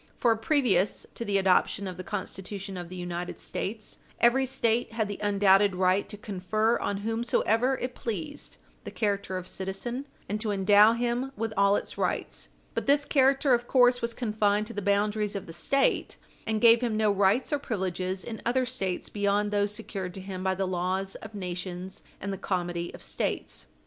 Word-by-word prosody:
For, 235 -2 +3
previous 225 - +1
to - - -4
the 205 -3 +1
adoption 195 +1 +2
of 185 - -5
the 185 - -7
Constitution 195 -1 -5
of 175 -1 -6
the 185 - -8
United 175 0 -5
States, 215 +2 -4 0.2
every 260 +3 +4
State 235 -3 0
had 220 -2 0
the 205 - -5
undoubted 200 -1 +4
right 185 +2 +2
to 210 - -6
confer 210 +3 0
on 200 - -1
whomsoever 230 +2 +1
it 250 0 -4
pleased 285 +7 -5 0.3
the - - -6
character 200 -3 -1
of 185 0 -6
citizen, 235 +10 -4 0.2
and 210 +1 -2
to 220 - -1
endow 205 +2 +6
him 240 +3 -1
with 225 -1 -2
all 200 0 +4
its - - -4
rights. - - -2 0.3
But - - -3
this 285 +1 +4
character, 270 -1 +4
of 240 0 +1
course, 245 -1 +4
was 235 0 -2
confined 210 -3 +1
to 230 - -7
the 205 - -3
boundaries 205 +1 +1
of 195 - -4
the 165 - -9
State, 275 +11 +1 0.3
and 220 -1 +1
gave 230 +1 +7
him 230 -3 0
no 215 -1 +3
rights 200 +8 +2
or 290 - +2
privileges 185 -5 -2
in 225 -2 -6
other 255 +2 +1
States 195 -8 -2
beyond 205 0 0
those 205 0 +1
secured 195 -4 -6
to 190 - -6
him 185 -1 -6
by 190 0 +1
the 190 +1 -1
laws 185 +2 -1
of 220 -1 -10
nations 180 0 -5 0.2
and 200 0 -3
the 195 - -6
comity 175 -3 -2
of - - -9
States. - - -3
205 Hz, 185 wpm, -28 LUFS, 190-235 Hz, 0.3 s, gave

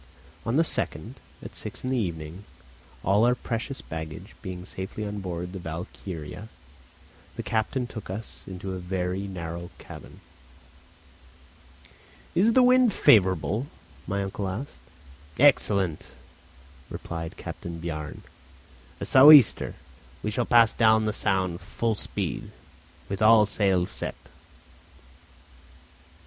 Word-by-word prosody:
On 115 - +1
the 160 - +5
2nd, - - -2 0.3
at - - -9
six - - -6
in 130 - -2
the - - +1
evening, 85 -2 -4 0.6
all 100 +4 +3
our 120 +1 +4
precious 120 +3 -4
baggage 80 +5 -8
being 90 -3 -7
safely 95 +4 -6
on 105 0 -4
board 90 -1 -5
the 95 - -5
Valkyria, 85 +2 -7 0.9
the - - -5
captain 115 +4 -1
took 110 -5 -9
us 105 +4 -7
into 95 0 -6
a 95 - -4
very 90 +2 -3
narrow 85 -2 -6
cabin. - - -12 2.1
"Is 215 +6 +4
the 255 - +6
wind 250 -2 +5
favourable?" 100 - +3 0.4
my 100 0 -1
uncle 95 0 -4
asked. 110 +10 -5 0.7
"Excellent," 100 - +3 0.9
replied 80 -1 -6
Captain 85 -1 -7
Bjarne; 80 -3 -6 0.8
"a - - -4
sou' 135 +3 +9
easter. 145 -7 +6 0.5
We 105 - -1
shall 120 +3 0
pass 115 -2 +6
down 110 -1 +4
the 105 - 0
Sound 95 -4 0
full 115 -1 -1
speed, 105 - -4 0.6
with 100 +1 -4
all 110 0 +7
sails 95 -3 +1
set." - - -3
100 Hz, 120 wpm, -26 LUFS, 90-115 Hz, 2.1 s, sou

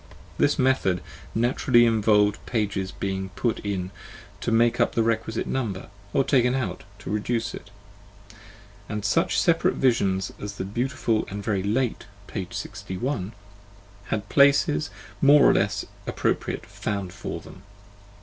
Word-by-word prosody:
This 145 - +3
method 130 -9 +2 0.4
naturally 120 +1 +4
involved 105 -2 +3
pages 100 -5 -1
being 95 -1 -3
put 120 -2 0
in 95 -3 -3 0.5
to - - -2
make 115 +1 +3
up - - +2
the 115 - +3
requisite 110 0 -1
number, 105 -9 -3 0.2
or 135 - +3
taken 125 -2 +3
out 130 -3 -3
to 105 -2 -7
reduce 115 +2 -1
it: 105 - -9 1.2
and 105 -1 -3
such 165 +11 +2
separate 165 -1 +3
visions 100 -7 +1
as 105 0 -5
the 95 - -5
beautiful 115 +1 -1
and 100 +1 -5
very 100 -2 0
late 115 +5 -1 0.2
p. - - -5
61 100 +1 -4 0.7
had 105 -2 -3
places, 140 - +4 0.3
more 145 +1 +7
or - - +7
less - - 0 0.2
appropriate, - - -1
found 100 -4 -4
for - - -5
them. 95 - -13
110 Hz, 135 wpm, -25 LUFS, 100-125 Hz, 1.2 s, more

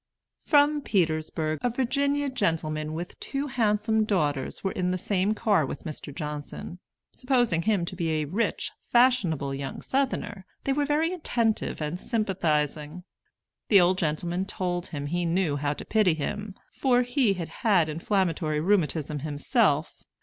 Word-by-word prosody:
From 295 0 +4
Petersburg, 155 - 0
a 245 - +1
Virginia 280 +4 0
gentleman 155 - -1
with 175 +2 -6
two 275 +1 -3
handsome 220 -4 +1
daughters 150 -10 -1
were 190 - 0
in 180 -1 -1
the 185 - 0
same 195 +3 0
car 210 -7 +2
with 135 - -5
Mr. 155 -1 -6
Johnson. 150 +3 -6 0.3
Supposing 245 -10 +1
him 195 -2 +1
to 185 - -5
be 170 -2 -1
a 155 -1 0
rich, 200 +11 -1 0.2
fashionable 210 - +3
young 135 0 -5
Southerner, 260 -7 -2 0.2
they 275 - +1
were 290 0 0
very 315 +4 +1
attentive 235 - 0
and 155 +4 -3
sympathizing. 165 - -1 0.7
The 200 - +8
old 185 +1 +3
gentleman 170 +3 -1
told 180 -2 -2
him 145 -3 -5
he 175 +4 -1
knew 170 -3 +1
how 145 0 0
to - - -8
pity 210 -7 +3
him, 205 +6 -4 0.2
for 250 -2 +3
he 245 -4 +2
had 170 -3 -5
had 195 -8 +4
inflammatory 165 -2 0
rheumatism 155 -5 +1
himself. 150 - +1
185 Hz, 150 wpm, -27 LUFS, 155-230 Hz, 0.7 s, The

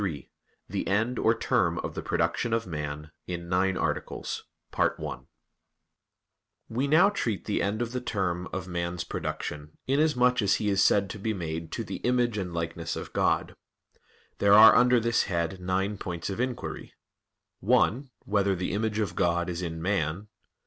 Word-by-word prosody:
_______________________ - - 0
QUESTION 75 -8 -4 0.4
93 - - 0
THE - - -9
END 115 +5 +1
OR 110 - +4
TERM - - +1
OF - - -4
THE - - -4
PRODUCTION 115 -1 0
OF 115 0 0
MAN 75 -2 -5 0.2
(In 85 -1 -5
Nine 95 +1 +1
Articles) - - -3 2.2
We 125 +5 -1
now 160 +7 +6
treat 115 - -2
of - - -29
the 105 - 0
end 105 +4 0
or 120 +2 -3
term 95 -7 -2
of 95 0 -4
man's 85 -1 -3
production, 75 +1 -5
inasmuch 130 -4 +3
as 100 -1 +3
he 105 - -1
is 100 -1 +3
said 100 -1 +4
to 110 - -7
be 110 +2 -1
made 80 -2 -4
"to - - -2
the - - -5
image 120 -3 +1
and 90 -2 -4
likeness 85 0 -3
of - - -7
God." - - +1 0.8
There 100 0 +5
are 110 +2 +10
under 125 0 +5
this 115 +1 +1
head 85 0 -2
nine 95 +3 -1
points 85 +1 -4
of 95 - -5
inquiry: 125 -1 -4 0.7
(1) 130 +5 +2 0.2
Whether 100 -1 +1
the 90 0 -3
image 105 +1 -1
of 100 -5 -1
God 85 +1 +1
is 85 0 -4
in 80 -2 -4
man? 95 +1 -1
100 Hz, 170 wpm, -28 LUFS, 85-115 Hz, 2.2 s, are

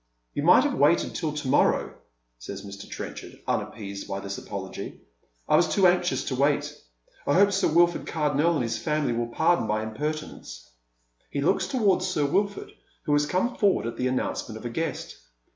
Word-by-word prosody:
"You - - -2
might - - +6
have - - 0
waited - - +3
till - - -2
to - - -4
morrow," - - +2 0.5
says 100 +11 -8
Mr. 100 0 -9
Trenchar". - - -7
unappeased 100 -2 -3
by 100 - -3
this 100 0 -5
apology. - - -7 0.3
" - - -41
I - - +4
was - - +4
too 195 - +3
anxious 180 0 +3
to 130 - -2
wait. 145 +2 +1 0.5
I 145 - +3
hope 200 +2 +5
Sir 195 0 +2
Wilford 170 +2 +3
Cardonnel 150 +1 +1
and 145 - 0
his 115 -1 -2
family 150 0 0
will 120 0 -1
pardon 160 +2 +2
my 110 +1 0
impertmence." 120 - -5 0.6
He 140 - -2
looks 185 +5 +2
towards 195 -6 +2
Sir 150 -6 0
Wilford, 200 +7 -1 0.3
who 145 - 0
has 145 0 +3
come 190 +9 0
forward 200 - +2
at 115 - -4
the 125 - 0
announcement 125 -3 -2
of 110 - -11
a 120 - -3
guest. 165 0 -3
145 Hz, 185 wpm, -26 LUFS, 115-175 Hz, 0.6 s, might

